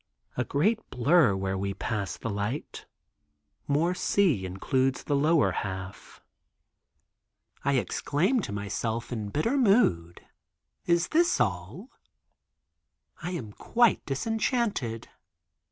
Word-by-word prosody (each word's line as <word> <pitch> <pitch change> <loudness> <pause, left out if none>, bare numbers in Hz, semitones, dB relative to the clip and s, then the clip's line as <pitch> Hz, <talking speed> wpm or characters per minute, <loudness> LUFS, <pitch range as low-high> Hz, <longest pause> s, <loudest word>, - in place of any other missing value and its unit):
A - - 0
great 205 +11 +1
blur 135 - +4
where 95 0 -2
we 100 0 -2
passed 105 -4 -3
the 115 - -3
light, 105 +8 -4 0.8
more 155 +5 +2
sea 175 - +1
includes 130 +8 0
the 145 - 0
lower 155 +2 +3
half. 95 -1 -6 1.4
I 140 - +1
exclaim 150 - +1
to 195 - -4
myself 110 +4 -3
in 110 -4 -3
bitter 225 - 0
mood, 195 - +2 0.7
is 170 0 +2
this 340 +2 +3
all! 105 - -2 1.3
I 170 - -4
am 110 -12 -6
quite 235 - +2
disenchanted. 205 - -1
135 Hz, 105 wpm, -28 LUFS, -, 1.4 s, blur